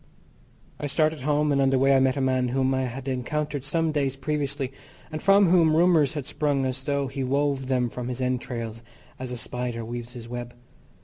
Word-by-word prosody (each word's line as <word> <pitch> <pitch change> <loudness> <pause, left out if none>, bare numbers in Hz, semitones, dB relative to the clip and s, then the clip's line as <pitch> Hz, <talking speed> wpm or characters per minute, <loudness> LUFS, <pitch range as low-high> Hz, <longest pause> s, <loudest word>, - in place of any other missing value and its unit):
I 145 - -2
started 155 +1 +1
home, 150 +2 +2
and 140 -1 +3
on 135 - +4
the 135 - +3
way 135 +1 +4
I - - +5
met 130 +1 +2
a - - 0
man 130 -1 +2
whom 130 +1 +1
I 130 0 0
had 130 +2 -6
encountered 145 +2 -2
some 160 +3 0
days 140 -3 0
previously, 140 -1 -2 0.4
and 155 - -4
from 195 0 +5
whom 165 -3 +5
rumours 165 -5 +4
had 145 -4 -4
sprung 145 -2 0
as 130 +1 -3
though 140 0 0
he 135 +1 -4
wove 140 0 0
them 125 -2 +1
from 120 +1 -5
his 125 0 -4
entrails, 120 -3 -3 0.4
as 130 -1 -5
a 125 - -4
spider 120 -1 -4
weaves 120 +1 -6
his 120 -2 -9
web. 120 0 -6
135 Hz, 205 wpm, -26 LUFS, 125-145 Hz, 0.4 s, I